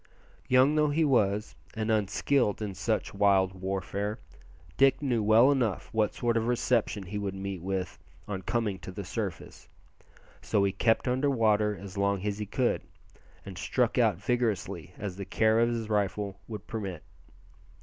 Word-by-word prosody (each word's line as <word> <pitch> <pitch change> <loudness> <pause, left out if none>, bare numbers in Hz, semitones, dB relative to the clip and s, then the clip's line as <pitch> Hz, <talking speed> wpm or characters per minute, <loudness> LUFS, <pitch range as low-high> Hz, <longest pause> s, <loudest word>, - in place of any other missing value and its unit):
Young 130 +3 +5
though 150 -1 +3
he 155 +2 +2
was, 105 -6 +1 0.2
and 110 0 -1
unskilled 110 +2 +1
in 105 -3 -4
such 105 +4 -2
wild 100 -2 +3
warfare, 95 +2 -3 0.6
Dick 135 - +4
knew 125 -6 0
well 110 +6 +6
enough 120 -8 0
what 110 -2 +1
sort 120 -1 0
of 115 0 0
reception 120 -4 +1
he 100 +3 -5
would 100 -1 -3
meet 95 -2 -5
with 95 0 -3 0.3
on 95 -2 -4
coming 105 -1 -1
to 85 +3 -8
the 100 +2 -6
surface, 95 -4 -6 0.7
so 100 - +1
he 100 - +2
kept 115 +5 +1
under 130 +3 +1
water 105 -5 +2
as 100 0 -7
long 100 -1 0
as 105 0 -2
he 105 - -4
could, 125 +4 0 0.6
and 95 -3 -8
struck 125 0 +1
out 110 -6 +4
as 95 - -18
vigorously 100 - -1
as 100 -3 -5
the 100 - -4
care 110 +3 +2
of 115 0 +3
his 115 -2 -2
rifle 100 -1 -1
would 110 -2 -7
permit. 95 -7 -5
105 Hz, 170 wpm, -29 LUFS, 100-115 Hz, 0.7 s, well